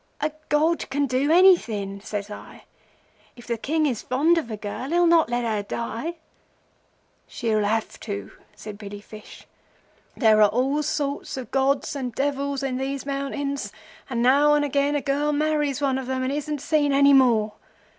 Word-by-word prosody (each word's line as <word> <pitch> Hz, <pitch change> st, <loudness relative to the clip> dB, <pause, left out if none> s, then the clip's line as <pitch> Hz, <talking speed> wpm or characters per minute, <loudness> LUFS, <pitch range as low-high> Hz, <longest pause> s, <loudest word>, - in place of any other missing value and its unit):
"'A 305 Hz, +1 st, -1 dB, 0.2 s
god 315 Hz, +3 st, +1 dB
can 285 Hz, +1 st, 0 dB
do 270 Hz, +3 st, 0 dB
anything,' 230 Hz, -, +3 dB
says 205 Hz, 0 st, -5 dB
I. 210 Hz, -, -11 dB, 0.7 s
'If 240 Hz, -, -14 dB
the 235 Hz, -, -2 dB
King 310 Hz, +7 st, 0 dB
is 250 Hz, -7 st, -1 dB
fond 310 Hz, +7 st, +2 dB
of 290 Hz, -, -7 dB
a 215 Hz, -, -5 dB
girl 210 Hz, +6 st, -6 dB
he'll 345 Hz, +2 st, +3 dB
not 335 Hz, -4 st, +4 dB
let 240 Hz, 0 st, -1 dB
her 220 Hz, -3 st, -1 dB
die.' 235 Hz, +10 st, -4 dB, 1.1 s
'She'll 220 Hz, -3 st, -1 dB
have 220 Hz, +2 st, -2 dB
to,' 100 Hz, 0 st, -6 dB, 0.2 s
said 210 Hz, -1 st, -9 dB
Billy 205 Hz, -1 st, -8 dB
Fish. 210 Hz, +1 st, -13 dB, 0.7 s
'There 220 Hz, -3 st, +4 dB
are 210 Hz, -, +6 dB
all 265 Hz, +7 st, 0 dB
sorts 290 Hz, -3 st, -3 dB
of 250 Hz, -4 st, -7 dB
gods 270 Hz, +2 st, +1 dB
and 250 Hz, -4 st, -4 dB
devils 280 Hz, 0 st, -1 dB
in 260 Hz, -2 st, -2 dB
these 270 Hz, +1 st, -3 dB
mountains, 280 Hz, 0 st, -3 dB, 0.4 s
and 235 Hz, -2 st, -1 dB
now 285 Hz, +4 st, +5 dB
and 295 Hz, 0 st, +2 dB
again 285 Hz, +1 st, +1 dB
a 290 Hz, -, 0 dB
girl 290 Hz, +2 st, 0 dB
marries 295 Hz, -1 st, 0 dB
one 270 Hz, -2 st, +1 dB
of 260 Hz, -, -7 dB
them 260 Hz, 0 st, -2 dB
and 260 Hz, +2 st, -1 dB
isn't 295 Hz, -1 st, -3 dB
seen 290 Hz, -1 st, +1 dB
any 280 Hz, 0 st, +5 dB
more. 230 Hz, -6 st, +4 dB
275 Hz, 175 wpm, -24 LUFS, 230-290 Hz, 1.1 s, are